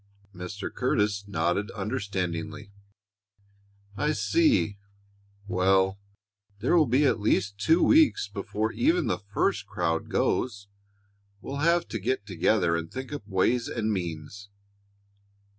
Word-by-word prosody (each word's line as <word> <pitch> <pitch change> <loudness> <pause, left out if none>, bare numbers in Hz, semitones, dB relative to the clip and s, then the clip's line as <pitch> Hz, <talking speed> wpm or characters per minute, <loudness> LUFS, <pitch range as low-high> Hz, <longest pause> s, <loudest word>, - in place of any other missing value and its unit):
Mr. 90 +2 -6
Curtis 105 -5 0
nodded 90 +3 0
understandingly. 100 -3 -3 1.2
"I 150 +7 0
see. 280 - +2 0.7
Well, 95 +1 +2 0.6
there 120 +11 +1
will 160 -4 +5
be 130 +5 +3
at 125 - +2
least 100 -1 0
two 160 - +3
weeks 310 - +4
before 105 +2 -3
even 330 - +2
the - - -1
first 100 0 -1
crowd 80 0 -2
goes. 100 -5 -1 0.7
We'll 135 +7 -6
have 170 +3 +2
to 115 - -3
get 115 +1 -1
together 90 -2 +1
and 85 0 -4
think 130 +2 -6
up 125 -8 -7
ways 110 +5 +1
and 110 -2 -1
means." 90 +2 -5
105 Hz, 120 wpm, -27 LUFS, 95-130 Hz, 1.2 s, will